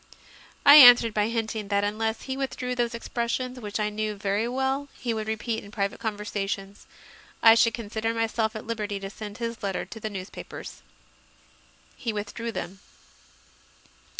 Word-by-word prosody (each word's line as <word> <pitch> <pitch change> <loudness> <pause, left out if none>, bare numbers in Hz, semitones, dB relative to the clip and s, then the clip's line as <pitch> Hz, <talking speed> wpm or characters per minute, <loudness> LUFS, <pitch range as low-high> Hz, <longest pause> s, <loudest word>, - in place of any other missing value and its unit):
I 285 +1 +11
answered 245 -5 +9
by 210 0 +1
hinting 225 -2 -3
that 200 0 +1
unless 220 +2 -1
he 265 - -4
withdrew 265 -2 -3
those 240 -1 -1
expressions, 245 +2 -3
which 210 -2 -4
I 210 0 0
knew 215 0 -2
very 200 +2 -1
well 265 +3 -1
he 240 -3 -2
would 220 -1 -4
repeat 220 +1 -2
in 200 - -12
private 200 -1 -2
conversations, 205 -2 -4 0.6
I 225 - +10
should 230 0 +3
consider 225 0 -3
myself 225 -1 -1
at 215 - -6
liberty 210 -3 -3
to 195 0 -7
send 210 0 -8
his 230 -1 -4
letter 195 -2 -2
to 225 - -10
the 215 - -4
newspapers. 195 -2 -8 1.1
He 235 - -3
withdrew 215 +3 -4
them. 190 -3 -6
220 Hz, 155 wpm, -26 LUFS, 205-235 Hz, 1.1 s, I